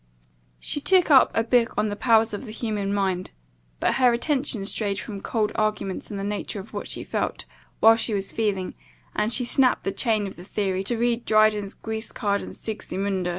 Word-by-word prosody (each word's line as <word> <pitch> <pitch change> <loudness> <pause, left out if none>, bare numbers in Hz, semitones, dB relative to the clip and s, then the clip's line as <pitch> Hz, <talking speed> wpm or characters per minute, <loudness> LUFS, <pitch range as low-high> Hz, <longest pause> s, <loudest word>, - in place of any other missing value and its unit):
She 290 - -2
took 365 0 +4
up 265 -2 +7
a 225 - +3
book 235 0 +2
on 210 0 +1
the 205 - -3
powers 225 -1 +3
of 205 - -5
the 220 - -8
human 210 -3 -2
mind; 190 -2 -1 0.5
but, - - +2
her 250 -1 +6
attention 255 -4 -1
strayed 200 -1 0
from 200 -3 -7
cold 215 -1 -1
arguments 215 -3 -1
on 205 - -5
the 195 - -4
nature 205 0 -3
of 195 - -11
what - - -4
she - - -4
felt, - - -3 0.4
while 225 +1 +7
she 225 -1 0
was 195 -1 -3
feeling, 200 -4 -1 0.4
and 215 - 0
she 245 +1 +3
snapt 255 +1 +2
the 195 - -1
chain 215 0 +1
of 195 - -8
the 175 - -10
theory 190 -1 -2
to 235 +3 -1
read 235 0 0
Dryden's 215 -2 +3
Guiscard 220 -2 -3
and - - -8
Sigismunda. 195 -3 -3
215 Hz, 195 wpm, -24 LUFS, 200-230 Hz, 0.5 s, up